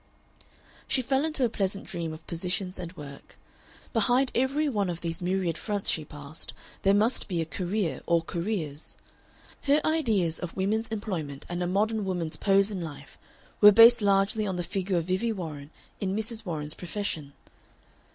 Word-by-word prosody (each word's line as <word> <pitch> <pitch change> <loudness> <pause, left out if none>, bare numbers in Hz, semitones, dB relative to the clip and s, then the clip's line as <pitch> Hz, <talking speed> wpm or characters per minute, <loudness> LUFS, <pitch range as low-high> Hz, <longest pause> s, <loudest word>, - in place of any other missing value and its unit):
She 260 - +1
fell 265 +3 +1
into 305 -5 +1
a - - +1
pleasant 195 -2 -2
dream 165 -2 -4
of 155 +1 -10
positions 180 +2 -2
and 170 -2 -5
work. 140 -2 -11 0.6
Behind 245 +3 +3
every 275 +5 +1
one 205 -8 0
of 170 -1 -4
these 165 +1 -3
myriad 180 -3 0
fronts 205 -2 0
she 155 - -1
passed 150 +1 -8 0.3
there 195 +1 +4
must 220 +5 +2
be 175 -4 -1
a 165 - 0
career 180 -2 -2
or 170 -1 +3
careers. 170 -5 -3 0.6
Her 285 +1 +4
ideas 220 - +2
of 180 0 -6
women's 215 +4 0
employment 175 -10 -4
and 175 0 -3
a 175 - 0
modern 210 +4 +1
woman's 175 -4 -2
pose 195 +1 +4
in 190 -3 -3
life 145 -4 -9 0.4
were 210 0 +11
based 230 +3 +8
largely 200 +1 +2
on 190 - -2
the 175 - -2
figure 190 0 -1
of 165 - 0
Vivie 190 +6 0
Warren 155 -7 -6 0.3
in 195 -1 -1
Mrs. 220 +1 -2
Warren's 150 -3 -1
Profession. 170 -6 -4
190 Hz, 170 wpm, -28 LUFS, 165-215 Hz, 0.6 s, were